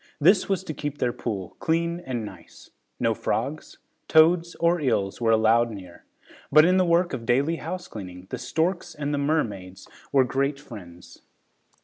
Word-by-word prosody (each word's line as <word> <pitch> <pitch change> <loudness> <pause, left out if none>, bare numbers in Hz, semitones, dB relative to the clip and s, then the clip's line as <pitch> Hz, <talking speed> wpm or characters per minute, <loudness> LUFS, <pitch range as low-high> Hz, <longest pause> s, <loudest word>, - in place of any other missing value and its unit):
This 185 +7 +4
was 190 -1 0
to 160 - -5
keep 145 -1 -5
their 125 -3 0
pool 100 -6 -5
clean 170 +1 0
and 125 -9 -4
nice. - - -13 0.3
No 115 -2 +2
frogs, 125 +9 -3 0.3
toads 165 +2 +4
or 170 0 +1
eels 110 -7 0
were 115 - +2
allowed 115 +1 +4
near, 95 -5 -11 0.5
but 155 +2 +7
in 185 +2 +4
the 185 - +3
work 170 0 +2
of 125 -3 -4
daily 140 +8 +1
housecleaning, 100 - -7
the - - -4
storks 160 +6 -2
and 145 0 -3
the 145 - 0
mermaids 105 -11 -2 0.2
were 135 -2 +5
great 140 +3 -1
friends. 90 -10 -12
140 Hz, 160 wpm, -25 LUFS, 110-165 Hz, 0.5 s, but